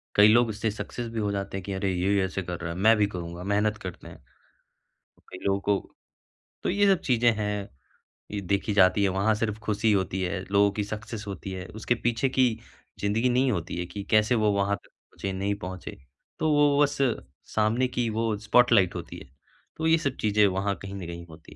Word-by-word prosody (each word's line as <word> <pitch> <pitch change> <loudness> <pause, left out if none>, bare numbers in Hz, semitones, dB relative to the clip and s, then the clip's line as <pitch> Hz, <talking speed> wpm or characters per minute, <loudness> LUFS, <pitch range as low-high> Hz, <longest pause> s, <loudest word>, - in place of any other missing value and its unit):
कई 105 0 +8
लोग 115 +1 +5
इससे 110 +1 -2
सक्सेस 120 +3 -6
भी 115 - -3
हो 105 -1 0
जाते 100 -1 -3
हैं 95 - -6
कि 100 - -4
अरे 95 0 -1
ये 95 +2 +1
ऐसे 95 +1 -3
कर 90 0 -5
रहा 85 - -3
है, - - -8
मैं 110 +4 +5
भी 105 - +3
करूँगा, 85 -2 -6
मेहनत 105 +2 +1
करते 90 - -7
हैं। - - -13 1.1
कई 95 - -9
लोगों 100 0 +1
को 100 -1 -1 0.7
तो - - 0
ये 205 +2 +3
सब 185 - -6
चीज़ें 120 -2 +3
हैं, 105 -1 -2 0.6
ये 105 - -3
देखी 100 +2 -1
जाती 100 +1 +4
है 100 - +3
वहाँ 100 +4 +2
सिर्फ 105 -1 -2
खुशी 110 +1 +1
होती 95 -2 0
है, 90 +1 -2
लोगों 100 0 +4
की 105 +1 -2
सक्सेस 110 +1 -6
होती 95 -1 -6
है, 95 -1 -6
उसके 115 +2 0
पीछे 120 +3 0
की 130 -1 +3 0.5
ज़िंदगी 110 +5 +1
नहीं 125 +1 +2
होती 85 -4 -3
है 90 - -2
कि 100 +3 -7
कैसे 110 +3 +4
वो 110 -2 +2
वहाँ 100 0 +1
तक - - -24
पहुँचे, 95 - -8
नहीं 100 +2 -1
पहुँचे। 95 -2 -7 0.4
तो 155 - +1
वो 145 -1 +4
बस 145 0 +2 0.6
सामने 110 +4 +2
की 120 -2 -1
वो 110 -1 -1
स्पॉटलाइट 110 -3 +4
होती - - -7
है। - - -12 0.5
तो 160 0 0
ये 165 0 +5
सब 140 -4 -2
चीज़ें 105 0 +4
वहाँ 100 +1 -1
कहीं 95 0 -7
न 95 -3 -6
कहीं 85 0 -7
होती 80 0 -14
105 Hz, 210 wpm, -27 LUFS, 95-115 Hz, 1.1 s, कई